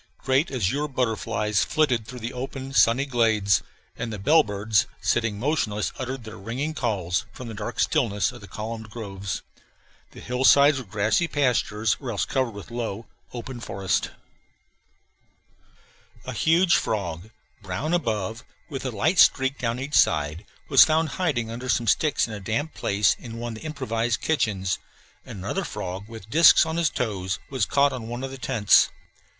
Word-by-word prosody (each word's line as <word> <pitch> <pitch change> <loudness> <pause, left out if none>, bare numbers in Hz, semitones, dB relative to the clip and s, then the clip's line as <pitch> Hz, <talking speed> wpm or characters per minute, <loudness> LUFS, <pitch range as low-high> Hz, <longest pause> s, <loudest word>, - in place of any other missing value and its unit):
Great 135 +4 +1
azure 130 +4 -1
butterflies 110 -5 0
flitted 130 -8 +1
through 125 - -8
the 120 +1 -5
open, 135 +1 -6
sunny 130 +1 +4
glades, 110 -6 +2 0.3
and 115 -1 -4
the 105 - -4
bellbirds, 105 -5 +2
sitting 115 -3 0
motionless, 110 - -1
uttered 130 -1 -4
their 110 0 -9
ringing 125 +10 -3
calls 95 - -1
from 125 - -9
the 115 - -6
dark 105 +3 -6
stillness 105 -5 +1
of - - -12
the 105 - -11
columned 110 +1 -6
groves. 100 -4 -5 0.7
The - - -13
hillsides 135 +3 +4
were 130 - -8
grassy 110 - +1
pastures 115 -7 +1
or 130 - -6
else 105 -4 -1
covered 130 -2 0
with 100 +2 -10
low, 115 -2 -4 0.3
open 120 +1 -7
forest. 95 -4 -1 2.2
A - - -5
huge 170 +3 +4
frog, 95 -2 -3 0.3
brown 100 - -3
above, 115 - -1 0.3
with 135 -4 -5
a - - 0
light 145 - +1
streak 135 +1 +4
down 120 0 -1
each 140 +3 -6
side, 75 +2 +2 0.2
was - - +8
found 160 0 +2
hiding 140 -11 -1
under 125 +3 -6
some 120 -1 +1
sticks 150 +7 +2
in 110 - -7
a 105 - -5
damp 115 +11 -2
place 100 0 +2
in 115 -2 -8
one 120 0 -4
of - - -9
the - - -11
improvised 120 -6 -1
kitchens; 95 - 0 0.5
and - - -8
another 95 +1 -3
frog, 95 +2 -5
with 110 -3 -10
disks 165 +7 +7
on 160 0 -3
his 170 -3 +2
toes, 95 -7 -2
was 130 -7 0
caught 140 0 +3
on 120 -3 -6
one 120 +2 -5
of 135 - -4
the 135 - -9
tents. 115 -4 +4
115 Hz, 165 wpm, -25 LUFS, 105-135 Hz, 2.2 s, was